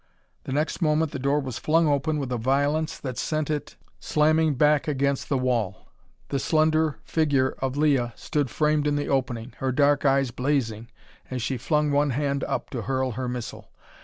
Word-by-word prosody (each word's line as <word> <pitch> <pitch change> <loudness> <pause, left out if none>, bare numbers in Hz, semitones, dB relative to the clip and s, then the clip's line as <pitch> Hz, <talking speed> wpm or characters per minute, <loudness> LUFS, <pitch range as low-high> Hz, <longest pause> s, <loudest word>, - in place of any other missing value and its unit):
The - - -5
next 150 +6 -1
moment 155 -1 +2
the 140 - -5
door 140 +3 +1
was 130 -4 -5
flung 165 +1 +3
open 150 +2 +1
with 135 -3 -3
a 125 - 0
violence 145 +6 0
that 130 -3 -5
sent 155 -1 -1
it 150 -1 -4 0.2
slamming 155 0 +2
back 150 +2 +3
against 140 -1 0
the 140 - +2
wall. 120 -7 -2 0.4
The 140 - -1
slender 155 -2 +2
figure 145 -5 +1
of 135 +1 -2
Leah 140 -5 +2
stood 145 -4 -2
framed 150 +2 +1
in 145 - +1
the 145 - -2
opening, 125 -3 -1
her 130 -1 -1
dark 145 +2 +3
eyes 135 -2 +2
blazing 125 -4 -1 0.4
as 125 -3 -3
she 130 +4 -1
flung 150 +4 0
one 145 +1 +2
hand 140 +1 -1
up - - -3
to 125 - -3
hurl 130 +2 -1
her 125 +2 -4
missile. 125 -2 -6
140 Hz, 185 wpm, -25 LUFS, 130-150 Hz, 0.4 s, flung